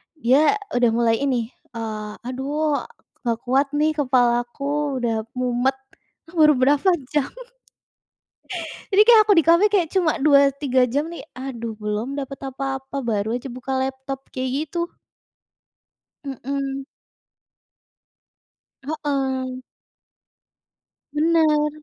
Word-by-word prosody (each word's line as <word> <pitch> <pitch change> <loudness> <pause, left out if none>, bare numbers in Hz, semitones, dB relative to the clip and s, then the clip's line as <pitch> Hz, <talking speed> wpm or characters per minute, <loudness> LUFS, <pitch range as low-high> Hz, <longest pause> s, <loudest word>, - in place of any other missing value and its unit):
dia 290 - +4 0.2
udah 245 -1 +4
mulai 230 -1 +2
ini, 245 -5 0 0.3
eee, 215 -2 -5 0.2
"Aduh, 285 +3 -1 0.5
nggak 230 -1 0
kuat 270 +3 +2
nih, 305 +1 +3
kepalaku 265 +2 +1
udah 225 -2 -1
mumet", 250 +1 +1 0.5
ah, 340 - -17
baru 300 -1 +7
berapa 280 +7 +3 0.2
jam. 295 -3 +2 1.7
Jadi 400 +2 +7
kayak 465 -2 +8
aku 420 - +5
di - - +6
kafe 340 +5 +6
kayak 355 -6 +2
cuma 340 -5 +3
2-3 280 -3 +4
jam 290 +6 -1
nih, 340 - -8
aduh, 240 -3 -5
belum 215 +6 -3
dapat 275 0 -7
apa-apa, 270 0 -4
baru 220 -1 -1
aja 250 - -6
buka 255 +2 -4
laptop, 265 0 -4
kayak 255 0 -2 0.2
gitu. 340 +1 -2 1.4
Mhm. 275 0 -4 2.0
Heeh. 265 -4 -2 1.6
Benar, 310 -1 +3
270 Hz, 105 wpm, -22 LUFS, 245-295 Hz, 2.0 s, kayak